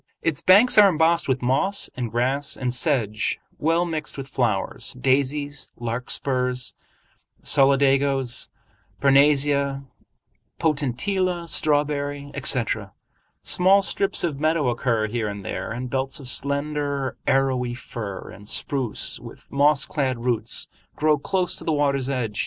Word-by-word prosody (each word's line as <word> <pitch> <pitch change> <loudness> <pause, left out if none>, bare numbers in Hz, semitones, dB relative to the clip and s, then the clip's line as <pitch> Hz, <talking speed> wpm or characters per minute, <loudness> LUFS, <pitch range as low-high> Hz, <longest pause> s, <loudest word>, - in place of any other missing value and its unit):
Its 165 -4 -1
banks 210 +5 +6
are 205 -1 +8
embossed 165 0 +2
with 130 -1 -1
moss 140 +11 +1
and 125 -2 -3
grass 130 +5 -1
and 125 -2 -2
sedge 125 -6 0 0.2
well 165 +3 +1
mixed 155 -4 -4
with 135 -1 -6
flowers—daisies, 135 +5 -1
larkspurs, 125 +2 -1 0.7
solidagos, 135 -2 +2 0.5
parnassia, 140 0 +3 0.7
potentilla, 170 - -1
strawberry, 145 -2 0
etc. 120 -7 0 0.5
Small 195 +2 +4
strips 195 0 0
of 155 -5 -2
meadow 155 -3 +1
occur 120 -2 0
here 110 0 -2
and 100 -1 -6
there, - - -4
and 125 +1 -5
belts 135 +1 -1
of 135 - -7
slender 140 0 -1
arrowy 130 -2 +1
fir 105 -5 -7
and 100 +2 -12
spruce 130 -7 +1
with - - -13
moss 145 0 +3
clad 130 -5 -2
roots 115 -2 0 0.3
grow 150 -1 +2
close 180 +4 -1
to - - -7
the 160 - -1
water's 140 -3 0
edge. 115 -6 -3
140 Hz, 125 wpm, -23 LUFS, 125-150 Hz, 0.7 s, are